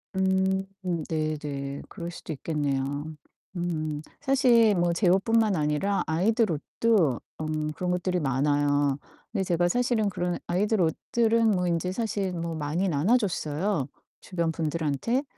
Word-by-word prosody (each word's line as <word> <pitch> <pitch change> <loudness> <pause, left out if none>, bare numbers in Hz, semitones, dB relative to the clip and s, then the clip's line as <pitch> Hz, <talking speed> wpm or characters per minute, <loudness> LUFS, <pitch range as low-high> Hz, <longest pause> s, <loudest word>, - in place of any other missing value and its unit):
음 190 0 +2 0.4
네네. 150 -3 -3
그럴 170 0 -6
수도 165 - -7
있겠네요. 145 -1 -2 0.5
음 155 -4 -2 0.2
사실 245 -6 +4
뭐 175 -1 +2
제 180 +2 +1
옷뿐만 210 +2 +3
아니라 150 +6 0
아이들 210 +5 +2
옷도 160 - +1 0.2
음 155 0 -2
그런 180 +3 -3
것들이 180 0 0
많아요. 145 0 +1 0.3
근데 200 -4 0
제가 175 -1 +1
사실은 240 -1 +1
그런 175 -2 -2
아이들 200 +3 +1
옷들은 225 +7 +2
뭐 180 -2 +1
인제 170 +2 0
사실 205 -3 -2
뭐 170 -1 -3
많이 160 +5 -1
나눠 175 - +3
줬어요, 170 - -1 0.3
주변 170 -3 -1
분들한테. 160 - -1
175 Hz, 275 characters per minute, -27 LUFS, 150-200 Hz, 0.5 s, 사실